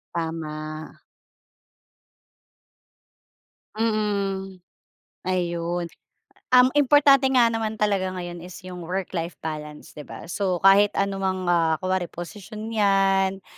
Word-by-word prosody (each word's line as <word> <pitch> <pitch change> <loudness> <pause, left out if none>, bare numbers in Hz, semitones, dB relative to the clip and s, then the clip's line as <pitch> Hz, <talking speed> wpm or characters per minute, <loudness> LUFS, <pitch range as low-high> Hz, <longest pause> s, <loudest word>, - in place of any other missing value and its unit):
Tama. 155 -2 -5 2.8
Mm. 200 -4 -1 0.6
Ayun, 175 -1 -2 0.6
um, 250 0 +6
importante 285 -1 +5
nga 245 -3 +4
naman 220 -1 -2
talaga 200 -3 +1
ngayon 175 -1 -6
is 180 +1 -10
yung 180 -1 -8
work-life 175 -1 -4
balance, 150 -1 -6
'di - - -10
ba? - - -9
So 190 -4 -1
kahit 200 +1 +6
anumang 195 -1 -1
ah, 165 -2 +2
kunwari 185 0 -2
posisyon 210 +6 -8
'yan 195 -2 +2
190 Hz, 95 wpm, -24 LUFS, 175-210 Hz, 2.8 s, um